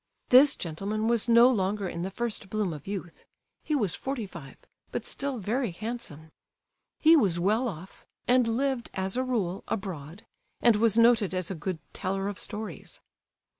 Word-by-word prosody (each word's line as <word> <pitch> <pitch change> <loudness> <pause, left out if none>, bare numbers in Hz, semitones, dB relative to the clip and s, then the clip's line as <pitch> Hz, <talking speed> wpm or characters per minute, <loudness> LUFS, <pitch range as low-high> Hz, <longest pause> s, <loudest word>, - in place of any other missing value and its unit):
This 270 +3 +7
gentleman 200 +6 -3
was 235 0 +2
no 235 +1 +8
longer 205 -4 0
in 170 -1 -5
the 185 - -2
first 215 -1 -3
bloom 205 -4 -1
of 150 +1 -10
youth—he 195 - -7
was 205 - 0
forty 265 -5 -3
five, 155 -8 -11 0.3
but - - -4
still 280 -2 -3
very 235 +4 -1
handsome. 175 -6 -7 0.7
He 320 +1 +7
was 195 - +3
well 215 +8 +2
off, 185 -2 -9 0.2
and 250 -1 +4
lived, 255 +1 -1
as 190 0 -1
a 255 - +1
rule, 205 -8 -2
abroad, 180 -3 -5 0.3
and 235 -2 +5
was 225 0 +3
noted 230 -5 +4
as 185 0 -2
a 165 -5 -6
good 185 +1 -2 0.2
teller 195 0 -2
of 200 -2 -4
stories. 215 +1 -6
210 Hz, 165 wpm, -28 LUFS, 185-235 Hz, 0.7 s, no